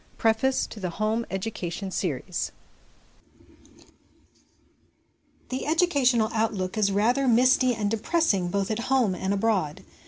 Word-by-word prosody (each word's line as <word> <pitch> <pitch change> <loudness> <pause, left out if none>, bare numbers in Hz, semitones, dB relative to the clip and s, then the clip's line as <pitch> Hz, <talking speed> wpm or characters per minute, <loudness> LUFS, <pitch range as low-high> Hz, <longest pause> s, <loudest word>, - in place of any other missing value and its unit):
Preface 225 +4 +2
to 215 - -10
the 185 -2 -3
c 170 - -10
Home 220 +2 -1
Education' 190 -1 -4
Series 180 0 -3 3.0
THE 260 +2 -4
educational 275 -9 +2
outlook 215 -4 -1
is 210 -2 +2
rather 240 +7 +2
misty 250 +1 +4
and 210 -2 -1
depressing 225 - +1
both 195 +3 -1
at 215 - -1
home 255 -7 +3
and 190 +1 -3
abroad. 195 -7 0
220 Hz, 120 wpm, -26 LUFS, 195-245 Hz, 3.0 s, misty